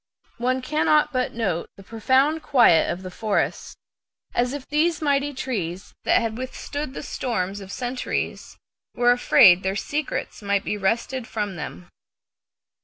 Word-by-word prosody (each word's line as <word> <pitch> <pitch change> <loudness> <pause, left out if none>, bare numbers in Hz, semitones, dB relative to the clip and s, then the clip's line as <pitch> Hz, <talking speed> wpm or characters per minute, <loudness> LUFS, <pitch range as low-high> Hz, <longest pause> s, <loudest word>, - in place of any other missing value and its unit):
One 255 +2 0
cannot 300 +1 +2
but 255 -1 -1
note 195 -8 -2
the 195 - -12
profound 265 +9 +1
quiet 235 - +4
of 185 - -4
the 185 - -7
forest, 210 +2 -2 0.6
as 245 +1 +1
if 280 -1 -6
these 315 +2 +1
mighty 285 -1 +1
trees 200 -9 -4
that - - +4
had 225 0 -3
withstood 270 +2 -5
the - - -5
storms 200 -8 -3
of 195 0 -9
centuries 250 +2 -4 0.4
were 245 0 +4
afraid 195 -6 +6
their 190 0 -1
secrets 290 +6 -3
might 200 -1 0
be - - -2
wrested 230 +5 -1
from 205 -5 -3
them. 130 - -7
240 Hz, 145 wpm, -24 LUFS, 195-270 Hz, 0.6 s, afraid